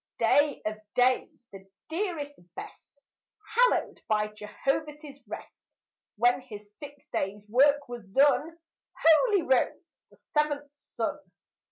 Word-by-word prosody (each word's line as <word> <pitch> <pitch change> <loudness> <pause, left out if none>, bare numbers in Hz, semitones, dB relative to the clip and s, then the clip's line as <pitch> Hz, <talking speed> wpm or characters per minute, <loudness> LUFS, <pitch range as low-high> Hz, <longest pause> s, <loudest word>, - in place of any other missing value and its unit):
Day 290 -1 +3
of 215 0 -3 0.2
days, 250 +1 +3 0.2
the 195 -1 -11 0.2
dearest, 325 -5 -3 0.2
best, - - -10 0.6
Hallowed - - +2
by 210 -1 +1
Jehovah's 275 +7 -4
rest! - - -9 0.5
When 245 +3 +3
his 210 -5 -11
six 290 0 -11
days' 205 +2 -3
work 280 +5 +4
was 240 -2 -7
done, 290 +8 +3 0.5
Holy 375 +4 +5
rose 260 -3 +1 0.2
the - - -23
seventh 290 -1 -1 0.2
sun. - - -1
280 Hz, 115 wpm, -28 LUFS, 215-300 Hz, 0.6 s, Holy